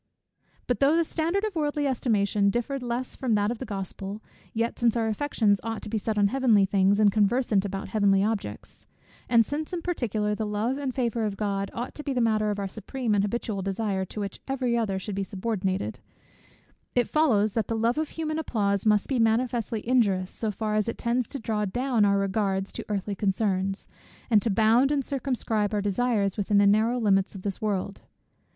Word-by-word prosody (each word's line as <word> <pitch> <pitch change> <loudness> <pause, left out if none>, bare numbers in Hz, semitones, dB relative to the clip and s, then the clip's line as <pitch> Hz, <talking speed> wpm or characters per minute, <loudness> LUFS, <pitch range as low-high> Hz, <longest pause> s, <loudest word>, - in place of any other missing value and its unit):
But 245 - -1
though 280 +3 +4
the 335 - +3
standard 335 +5 -1
of 430 -2 -1
worldly 295 -2 0
estimation 210 -6 +1
differed 240 +5 -2
less 245 +1 -3
from 245 -5 0
that 205 +1 +1
of 240 - -5
the - - -6
Gospel; 195 0 -5 0.3
yet 230 +1 -2
since 235 -1 +3
our 225 -1 +1
affections 220 -4 +1
ought 225 0 -4
to - - -6
be 220 - 0
set 215 +1 -2
on 200 -1 +4
heavenly 230 -5 +4
things, 195 +1 +3
and 210 -2 +5
conversant 210 0 +2
about 195 -1 -4
heavenly 200 -1 +3
objects; 205 - -4 0.4
and 230 -2 +5
since 305 - -4
in 340 -2 -3
particular 220 - -1
the 220 - -2
love 220 +6 -1
and 270 -3 -3
favour 235 -3 0
of 205 -2 -2
God 200 -2 -1
ought 240 +2 -4
to - - -8
be 280 - -2
the 250 - 0
matter 215 -2 +2
of 205 - -1
our 200 -1 -2
supreme 220 +4 -3
and 200 -1 +3
habitual 205 -1 -2
desire, 195 0 -1
to 210 - -8
which 200 -2 -4
every 255 -3 0
other 215 -5 0
should 200 +2 -5
be 195 - -2
subordinated; 190 - -2 1.0
it 245 -1 +3
follows, 220 -10 +2
that 225 - -1
the 225 - -1
love 235 +5 +1
of 315 - -1
human 315 -1 -3
applause 200 -8 0
must 210 -1 +3
be 265 -3 0
manifestly 230 -1 0
injurious, 200 -7 +2
so 220 - -3
far 215 +1 -2
as 215 +1 +1
it - - -4
tends 235 0 0
to - - -4
draw 220 -3 -2
down 240 +2 +1
our 200 0 +3
regards 195 -1 0
to - - -5
earthly 205 0 -2
concerns, 195 -1 0 0.4
and 210 -2 +6
to 230 - 0
bound 225 +6 +4
and 280 -3 0
circumscribe 230 -6 -1
our - - +1
desires 205 -1 0
within 205 0 +1
the 200 - +5
narrow 220 +4 +3
limits 195 -3 +2
of 190 - -8
this 200 -2 -3
world. 200 -2 -2
215 Hz, 205 wpm, -26 LUFS, 200-245 Hz, 1.0 s, and